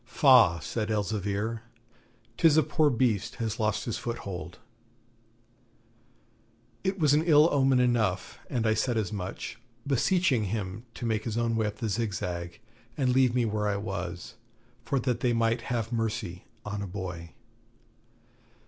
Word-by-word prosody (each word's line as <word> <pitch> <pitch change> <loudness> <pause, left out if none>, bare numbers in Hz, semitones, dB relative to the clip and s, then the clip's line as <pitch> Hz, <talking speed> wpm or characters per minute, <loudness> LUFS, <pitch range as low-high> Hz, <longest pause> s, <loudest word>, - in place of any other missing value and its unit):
'Faugh,' 120 - +5
said 110 -2 -3
Elzevir, 105 +1 -1 0.7
'tis 160 +1 +4
a 155 - +6
poor 155 +3 +2
beast 115 -5 0
has 110 -2 -3
lost 110 0 0
his 115 - -3
foothold.' 95 -7 -6 2.3
It 190 +1 -1
was 150 -5 +3
an 150 +2 +3
ill 155 -2 +6
omen 135 -2 +3
enough, 115 -7 0
and 115 -2 -1
I 110 - +3
said 115 +2 0
as 105 -3 -1
much, 95 +3 -5 0.3
beseeching 140 - +2
him 105 +2 -4
to 120 - -5
make 110 -2 0
his 115 -1 -3
own 115 -1 +1
way 110 -1 +1
up 105 0 -5
the 115 - -3
Zigzag 90 -5 -3 0.4
and 130 -3 +2
leave 130 -2 +3
me 125 -2 +2
where 105 -1 -1
I 100 -1 0
was, 90 -2 -5 0.5
for 135 +3 0
that 125 -1 -1
they 120 -1 +1
might 115 0 +1
have 115 -1 -2
mercy 110 -6 -3 0.2
on 105 0 -4
a 100 - -4
boy. 90 -3 -7
115 Hz, 150 wpm, -28 LUFS, 100-125 Hz, 2.3 s, a